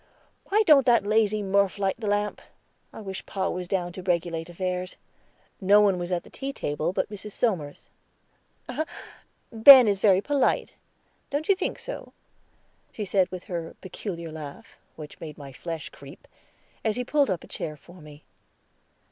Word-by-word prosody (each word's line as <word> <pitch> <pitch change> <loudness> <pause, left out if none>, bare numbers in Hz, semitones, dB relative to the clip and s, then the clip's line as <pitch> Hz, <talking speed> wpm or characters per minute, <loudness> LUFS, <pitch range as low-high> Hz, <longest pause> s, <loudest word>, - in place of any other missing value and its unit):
"Why 425 +2 +3
don't 290 -7 +6
that 235 -4 +4
lazy 215 0 +2
Murph 200 0 +2
light 195 +1 -1
the 220 - -4
lamp? 205 0 -1 0.5
I - - -10
wish 190 -2 -6
pa 195 -1 -2
was 180 0 -4
down 175 -2 -2
to 185 - -7
regulate 170 -2 -1
affairs." 180 +1 -4 0.6
No 200 +2 +6
one 200 -3 +3
was 175 +1 -4
at 175 -1 -1
the - - -17
tea 275 0 -5
table 155 - -2
but 190 - -2
Mrs. 205 0 -7
Somers. 170 -12 -2 1.6
"Ben 250 +2 +10
is 200 -2 +1
very 195 -2 +5
polite, 280 +6 0 0.6
don't 290 +2 -2
you 395 - +6
think 375 - -3
so?" - - -7 0.8
she 210 - -5
said 190 -1 +2
with 185 -1 -7
her 170 -2 -5
peculiar 170 -3 -6
laugh, 150 -3 -9 0.2
which 150 -2 -10
made 155 -3 -8
my 140 -2 -10
flesh 165 +2 -6
creep, - - -14 0.6
as 220 -2 +1
he 250 - -1
pulled 285 +1 +2
up 185 -4 -2
a - - -12
chair 150 -1 -6
for 175 +4 -16
me. 150 0 -14
190 Hz, 165 wpm, -26 LUFS, 170-215 Hz, 1.6 s, Ben